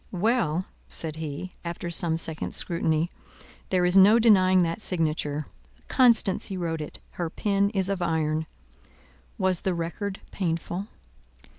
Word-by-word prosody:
"Well," 185 -4 +1 0.2
said 155 -2 -4
he, 160 +3 -5
after 170 0 -5
some 165 -1 +1
seconds' 160 -1 -3
scrutiny, 165 -1 0 0.6
"there 180 -1 +2
is 180 +1 +2
no 200 +4 +8
denying 185 -5 +5
that 170 +5 -2
signature: 155 -5 -1 0.4
Constancy 225 -6 +3
wrote 165 -3 -2
it: 150 - -7
her 175 -2 -3
pen 200 +3 +1
is 195 -3 -1
of 195 -2 -2
iron. 160 -2 0 0.9
Was 185 -2 +1
the 185 -2 0
record 190 +4 -4
painful?" 175 +2 -3
175 Hz, 130 wpm, -26 LUFS, 160-195 Hz, 0.9 s, no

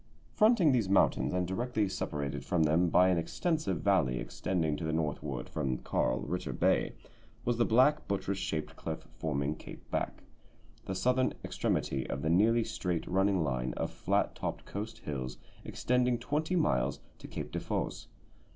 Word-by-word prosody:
Fronting 215 -8 +5
these 115 -7 +2
mountains, 100 - +3
and 90 -1 0
directly 110 +2 0
separated 75 -6 -3
from 85 -3 +2
them 80 +3 +3
by 90 +3 +5
an 90 -2 +3
extensive 150 - -1
valley 90 -11 +3
extending 80 +1 -1
to 75 - -6
the 80 - -1
northward 75 -5 -2
from 65 -2 -1
Carl - - 0
Ritter 90 -6 -3
Bay, - - +2 0.5
was 120 -1 +1
the 120 - +3
black 130 +6 +4
buttress 100 0 -1
shaped 80 -1 -3
cliff - - -6
forming 75 -1 0
Cape 75 - -11
Back, - - -2 0.6
the 95 - -3
southern 125 +6 +2
extremity 65 -1 -1
of 70 - -3
the 80 - +1
nearly 115 +6 +4
straight 90 -6 -2
running 95 -1 +2
line 65 -3 -1
of - - -2
flat - - 0
topped - - -4
coast 110 +3 -5
hills 65 - -5 0.3
extending 125 0 +1
twenty 150 +8 -1
miles 70 - +1 0.2
to - - -9
Cape - - -6
Defosse. - - -3
90 Hz, 160 wpm, -31 LUFS, 75-115 Hz, 0.6 s, Fronting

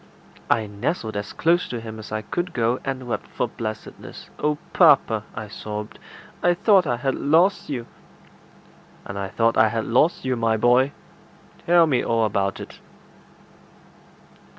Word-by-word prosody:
I 110 -2 +2
nestled 110 - -3
as 105 0 -4
close 170 +2 +1
to 120 - -4
him 110 -1 -8
as 110 - -10
I 110 0 -3
could 175 +10 -3
go, 120 -1 0
and 130 -2 -4
wept 120 - -3
for - - -2
blessedness. 110 -1 -8
"Oh, 150 0 0 0.2
papa!" 135 - +4
I 110 -1 -6
sobbed, 105 +1 -7 0.4
"I 175 0 +3
thought 190 -2 +4
I 120 - 0
had 135 +2 -1
lost 170 +7 +2
you." 125 -5 -3 1.2
"And 100 - -6
I 100 - -3
thought 115 +3 +1
I 110 - +6
had 115 -1 -2
lost 130 +8 +2
you, 130 -1 0
my 115 -1 +1
boy. 125 +4 +3 0.8
Tell 170 0 +6
me 135 -6 +1
all 115 -1 +1
about 100 -2 -1
it." - - -10
120 Hz, 155 wpm, -23 LUFS, 110-150 Hz, 1.2 s, I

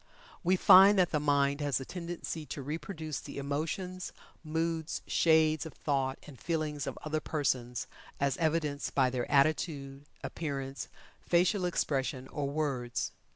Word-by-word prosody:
We 185 +2 +4
find 195 +2 +8
that 180 -2 +3
the 150 - +1
mind 140 0 +2
has 145 -2 +1
a 135 - -6
tendency 170 -2 -5
to 140 - -5
reproduce 155 +1 -4
the - - -9
emotions, 160 +6 -3 0.3
moods, 160 0 -2
shades 160 -2 +3
of 160 - -9
thought, 135 -2 -1
and 140 -4 -12
feelings 155 -3 -2
of - - -4
other 155 0 -1
persons, 130 -6 -1 0.3
as 140 -2 +1
evidenced 155 -3 -1
by 130 -2 +3
their 125 -1 -2
attitude, 140 -1 +1 0.2
appearance, 140 -4 -4 0.4
facial 180 +2 +2
expression, 135 -6 -1
or 140 -2 -2
words. 140 -5 -2
150 Hz, 140 wpm, -31 LUFS, 140-165 Hz, 0.4 s, find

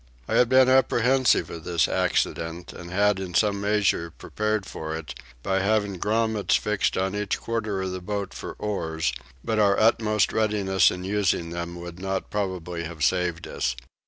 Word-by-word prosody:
I - - -3
had 125 - +4
been 130 0 +6
apprehensive 130 0 +3
of 80 -1 -7
this 85 -2 +1
accident, 85 +2 -1
and 85 - -9
had 100 +2 +2
in 90 -2 -6
some 100 0 +2
measure 100 -5 +1
prepared 105 +4 -2
for 80 -3 -5
it, 80 -1 -6 0.3
by 95 0 +1
having 100 -1 0
grummets 110 0 +1
fixed 105 -1 0
on 95 +1 0
each 105 -1 -2
quarter 110 -4 -2
of 95 - -3
the 90 0 -5
boat 100 +1 -4
for - - -7
oars; 80 -10 -2 0.3
but 110 -1 0
our 100 -1 +4
utmost 110 -1 +3
readiness 100 -4 +3
in 90 - -5
using 95 -4 0
them 85 0 -5
would 85 0 -8
not 95 0 -3
probably 90 -4 -3
have 80 -2 -5
saved 90 0 0
us. - - -2
95 Hz, 170 wpm, -25 LUFS, 85-105 Hz, 0.3 s, been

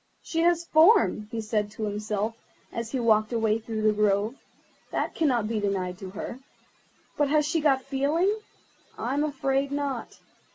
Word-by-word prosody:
"She 330 - -3
has 340 0 +3
form," 325 - +5
he 230 -1 -4
said 210 -1 -1
to 220 - -5
himself, 210 +1 -2 0.4
as 230 0 -4
he 265 - -1
walked 215 -2 +3
away 220 -1 +1
through 220 -1 -4
the 215 0 +4
grove—"that 210 +3 -2
cannot 250 -9 +1
be 220 -1 -1
denied 190 -3 -2
to 190 - -7
her; 205 +6 -6 0.8
but 290 -1 +2
has 300 0 +3
she 320 +1 0
got 270 -3 +3
feeling? 295 +9 +1 0.6
I 240 +4 -2
am 290 +1 +1
afraid 275 -1 0
not. 280 -4 -3
235 Hz, 160 wpm, -27 LUFS, 215-290 Hz, 0.8 s, form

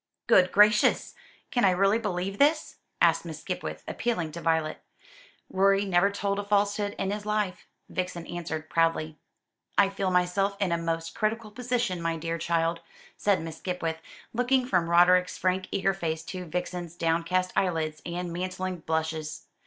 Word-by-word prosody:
"Good 185 -1 +5
gracious! 210 +1 +4 0.4
Can 245 - +1
I 195 - +6
really 195 +4 +3
believe 195 -2 -3
this?" 305 +2 +2 0.2
asked - - +4
Miss - - -7
Skipwith, - - -5
appealing 180 -10 -2
to 170 - -7
Violet. 160 -2 0 0.7
"Rorie 195 +1 +3
never 185 0 +3
told 200 0 -2
a - - -2
falsehood 205 0 +1
in 195 - -1
his 210 0 -3
life," 210 -3 -2 0.2
Vixen 180 -2 -4
answered 160 -2 -5
proudly. 160 -2 0 0.6
"I 200 -1 +5
feel 195 -1 -2
myself 185 +2 +1
in 195 -3 0
a 170 - +2
most 165 0 -2
critical 220 0 -2
position, 240 -5 -1
my 165 0 -1
dear 165 +1 -3
child," 165 0 0 0.4
said 200 -4 +1
Miss 160 -1 -7
Skipwith, 165 -3 -3 0.3
looking 250 +2 +2
from 180 -8 +1
Roderick's 180 +1 +4
frank 185 0 0
eager 195 0 +1
face 160 -3 -3
to 185 +1 -6
Vixen's 175 0 -4
downcast 170 +2 0
eyelids 160 -4 0
and 175 0 -4
mantling 185 +1 -3
blushes. 160 -1 -3
180 Hz, 155 wpm, -27 LUFS, 165-200 Hz, 0.7 s, I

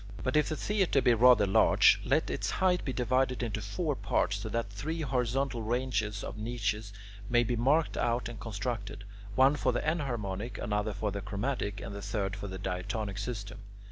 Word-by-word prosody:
But 130 +1 -1
if 150 -2 +3
the 155 - -1
theatre 195 -5 +1
be 125 -2 +4
rather 120 -2 +6
large, 95 - +5
let - - +1
its - - -2
height 180 -1 +1
be 135 - -2
divided 130 0 +1
into 110 -2 -2
four 145 - -2
parts, 100 -4 0
so 105 +2 -5
that 115 -2 -2
three 155 +11 -4
horizontal 130 -1 0
ranges 110 -3 -1
of 105 - -6
niches 110 -2 -2 0.4
may 120 0 +4
be 120 +1 -1
marked 140 +7 +2
out 120 -2 0
and 120 -2 -8
constructed: 105 -1 -4 0.3
one 135 +2 +5
for 130 -3 +1
the 120 +4 -2
enharmonic, 120 - -2
another 105 +1 -1
for 105 +1 -2
the 100 +1 -4
chromatic, 100 +1 -3
and 100 - -6
the 100 - -6
third 100 -1 -2
for 100 -1 -6
the 95 -1 -6
diatonic 100 +3 -3
system. 100 -2 -5
115 Hz, 185 wpm, -30 LUFS, 100-130 Hz, 0.4 s, rather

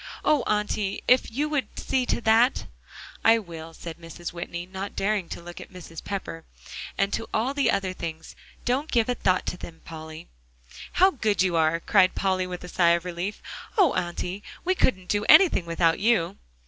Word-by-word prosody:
Oh, 300 -3 +4
Auntie! 210 -1 -1
if 250 0 +4
you 285 +7 -1
would 295 -3 -2
see 255 -2 0
to - - 0
that." 230 +3 +3 0.6
"I 225 +1 +6
will," 165 -6 -8
said 165 -1 -8
Mrs. 170 +1 -8
Whitney, 170 0 -5
not 190 +2 -6
daring 200 -3 0
to 170 - -7
look 175 0 -9
at - - -12
Mrs. 170 -3 -10
Pepper, 190 -5 -5 0.5
"and 195 +1 +1
to 225 - -3
all 240 +5 +1
the 280 -1 +2
other 195 -2 0
things; 160 -3 -7 0.3
don't 270 +5 0
give 235 -1 +2
a - - +3
thought 185 -6 +1
to 180 - -3
them, 165 -2 -10
Polly." 160 0 -9 0.7
"How 380 +2 +5
good 215 - +1
you 180 -2 +1
are," 160 0 +2
cried 185 +1 +3
Polly 185 -1 0
with 180 -1 -6
a - - -7
sigh 170 -1 +3
of 170 +1 -4
relief. 180 +3 -4 0.3
"Oh, 390 -4 +5
Auntie! 175 +3 -3 0.2
we 370 - +3
couldn't 190 - +1
do 205 +2 0
anything 310 - +7
without 165 0 +2
you." 210 -6 +2
190 Hz, 185 wpm, -26 LUFS, 170-225 Hz, 0.7 s, anything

